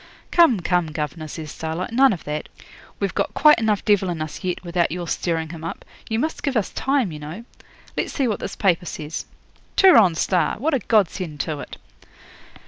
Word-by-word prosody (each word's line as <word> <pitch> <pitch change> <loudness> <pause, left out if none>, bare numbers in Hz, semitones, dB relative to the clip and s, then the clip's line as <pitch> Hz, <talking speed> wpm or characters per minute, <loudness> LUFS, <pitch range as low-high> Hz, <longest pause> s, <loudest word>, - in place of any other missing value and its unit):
'Come, 295 - +5
come, 175 -1 +1
governor,' 155 0 -4
says 155 0 -7
Starlight, 160 +6 -4
'none 265 +3 +5
of 185 - -4
that. 150 +1 -4 0.5
We've - - -1
got - - -1
quite 300 -4 +6
enough 215 -3 0
devil 200 -3 +3
in 170 -2 -3
us 155 +4 -6
yet, 180 -1 -2
without 170 -1 0
your 175 0 -4
stirring 165 -2 -1
him 160 -1 -8
up. 165 - -6 0.2
You 220 - 0
must 310 +7 -2
give 275 -4 0
us 210 - -1
time, 270 -8 0
you 150 - -7
know. 160 +10 -8 0.5
Let's - - -2
see 270 -4 +1
what 215 - -1
this - - -5
paper 180 -3 +1
says. 155 0 -5 0.5
"Turon 225 - +7
Star"! 175 -1 +1
What 300 +7 0
a 270 - +2
godsend 185 -9 0
to 155 -2 -3
it! - - -8
180 Hz, 195 wpm, -22 LUFS, 160-225 Hz, 0.5 s, Turon